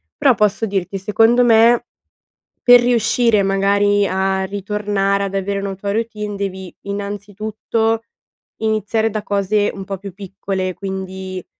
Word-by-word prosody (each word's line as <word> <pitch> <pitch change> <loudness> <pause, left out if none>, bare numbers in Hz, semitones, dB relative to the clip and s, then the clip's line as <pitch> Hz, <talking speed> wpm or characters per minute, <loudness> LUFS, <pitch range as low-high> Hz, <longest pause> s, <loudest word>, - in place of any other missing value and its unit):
Però 260 -4 +3
posso 210 +1 +1
dirti, 195 0 -2
secondo 225 +5 +3
me, 235 +1 +5 0.8
per 245 0 +8
riuscire 230 -2 +2
magari 200 +1 +2
a 190 0 0
ritornare 200 0 -1
ad 195 0 -5
avere 200 +1 -1
una 195 -1 -4
tua 200 +1 -4
routine 210 -2 -3
devi, 190 -2 -5
innanzitutto, 210 +3 -2 0.6
iniziare 220 0 0
da 215 0 -3
cose 205 +1 0
un 195 -1 -8
po' 195 -1 -4
più 195 -1 -9
piccole, 190 -1 -4
quindi 190 -1 -6
200 Hz, 130 wpm, -19 LUFS, 195-220 Hz, 0.8 s, per